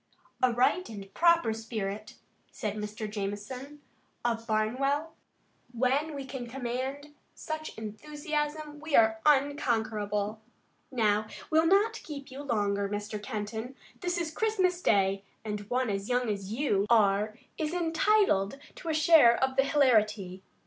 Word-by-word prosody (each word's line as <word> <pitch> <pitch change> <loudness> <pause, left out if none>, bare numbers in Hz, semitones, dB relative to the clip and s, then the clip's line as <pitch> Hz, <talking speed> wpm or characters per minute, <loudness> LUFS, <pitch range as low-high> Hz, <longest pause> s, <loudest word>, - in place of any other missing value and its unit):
"A 255 - +4
right 255 +10 +2
and 195 -3 -9
proper 335 -9 +4
spirit," 215 -2 -5 0.4
said 210 -2 -3
Mr. 215 +1 -5
Jamison, 215 +8 -6 0.4
of 230 -1 -1
Barnwell. 275 +8 0 0.6
"When 270 +6 +1
we 275 -1 -5
can 260 -2 -6
command 265 +4 -4 0.2
such 310 0 -6
enthusiasm 295 +6 -4
we 310 -1 -1
are 220 -1 +5
unconquerable. 220 -7 +1 0.5
Now, 215 -4 +1 0.2
we'll 320 +1 +4
not 415 +5 +3
keep 280 -3 -8
you 270 +2 -7
longer, 205 -6 0
Mr. 205 +1 -4
Kenton. 220 +4 -5 0.2
This 355 -1 -1
is 335 -2 -2
Christmas 375 -5 +1
Day, 195 - +2 0.2
and 210 -1 -4
one 250 -2 +1
as 195 +2 -3
young 245 -1 +1
as 200 -1 -5
you 220 -5 +1
are 215 -1 +3 0.2
is 310 -1 -1
entitled 330 - +2 0.2
to 330 - -6
a 315 - +1
share 310 -7 +7
of 265 0 0
the 270 - +4
hilarity. 215 -10 +2
245 Hz, 135 wpm, -29 LUFS, 210-295 Hz, 0.6 s, share